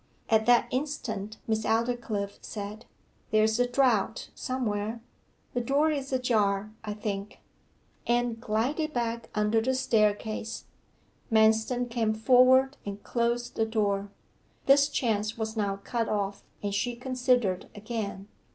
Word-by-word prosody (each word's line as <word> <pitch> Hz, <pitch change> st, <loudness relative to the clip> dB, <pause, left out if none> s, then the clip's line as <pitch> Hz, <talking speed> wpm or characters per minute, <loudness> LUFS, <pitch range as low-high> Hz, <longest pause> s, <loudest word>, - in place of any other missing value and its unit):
At 220 Hz, 0 st, +4 dB
that 240 Hz, -1 st, +5 dB
instant 235 Hz, -6 st, -3 dB
Miss 220 Hz, -1 st, 0 dB
Aldclyffe 225 Hz, -3 st, -1 dB
said 210 Hz, +1 st, -7 dB, 0.4 s
'There's 220 Hz, +1 st, +3 dB
a 245 Hz, -, +3 dB
draught 245 Hz, -4 st, +1 dB
somewhere. 225 Hz, -3 st, -2 dB, 0.5 s
The 245 Hz, -, 0 dB
door 285 Hz, +6 st, +2 dB
is 275 Hz, -2 st, -3 dB
ajar, 215 Hz, -5 st, +1 dB
I 210 Hz, -1 st, -4 dB
think.' 205 Hz, -1 st, -4 dB, 0.7 s
Anne 240 Hz, -1 st, +1 dB
glided 255 Hz, +8 st, -1 dB
back 235 Hz, -1 st, -2 dB
under 210 Hz, +1 st, +2 dB
the 260 Hz, +3 st, 0 dB
staircase. 215 Hz, -2 st, 0 dB, 0.7 s
Manston 220 Hz, +3 st, +3 dB
came 230 Hz, -2 st, 0 dB
forward 255 Hz, +4 st, +5 dB
and 200 Hz, 0 st, -6 dB
closed 240 Hz, 0 st, -1 dB
the 225 Hz, -, +2 dB
door. 205 Hz, -2 st, 0 dB, 0.6 s
This 280 Hz, +1 st, +6 dB
chance 215 Hz, -5 st, -1 dB
was 220 Hz, 0 st, -3 dB
now 200 Hz, -2 st, 0 dB
cut 230 Hz, +3 st, -3 dB
off, 200 Hz, -1 st, -2 dB, 0.2 s
and 200 Hz, -1 st, -1 dB
she 240 Hz, +4 st, -1 dB
considered 245 Hz, -6 st, 0 dB
again. 205 Hz, -2 st, -5 dB
225 Hz, 125 wpm, -28 LUFS, 210-245 Hz, 0.7 s, This